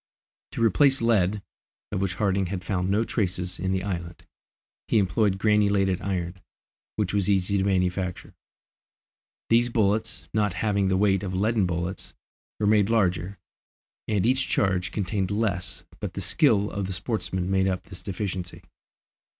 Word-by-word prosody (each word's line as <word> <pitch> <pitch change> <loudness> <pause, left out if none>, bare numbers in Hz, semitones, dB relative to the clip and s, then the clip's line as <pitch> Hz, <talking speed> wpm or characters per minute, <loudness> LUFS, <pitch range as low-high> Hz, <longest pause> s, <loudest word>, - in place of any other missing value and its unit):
To 115 - -1
replace 135 +6 +4
lead, 105 -3 +2 0.5
of 95 - -2
which 95 -3 -1
Harding 95 -2 +1
had 90 0 -4
found 95 -2 -1
no 105 +3 +2
traces 90 -5 -2
in 95 +1 -1
the 95 -1 -1
island, 85 -4 -5 0.6
he - - +2
employed 100 0 +2
granulated 100 -3 +2
iron, 90 -2 -3 0.5
which 105 -3 -1
was 100 -1 +1
easy 100 0 +2
to - - +1
manufacture. 90 -1 -1 1.2
These 120 +1 +4
bullets, 110 0 0
not 105 -3 +1
having 100 +1 0
the 95 0 +2
weight 95 -1 +3
of 95 -2 -4
leaden 105 0 +2
bullets, 85 +2 -4 0.4
were 105 - 0
made 105 -1 +4
larger, 95 -3 +1 0.7
and 105 -2 +1
each 130 +2 +2
charge 90 -2 +1
contained 100 -2 -1
less, 100 -3 -2 0.2
but - - -5
the - - -3
skill 105 -1 +3
of 100 -2 -3
the 95 - -4
sportsmen 95 -2 -2
made 95 0 +2
up 90 -1 -1
this 95 -2 -10
deficiency. 95 -2 -5
95 Hz, 150 wpm, -26 LUFS, 90-105 Hz, 1.2 s, replace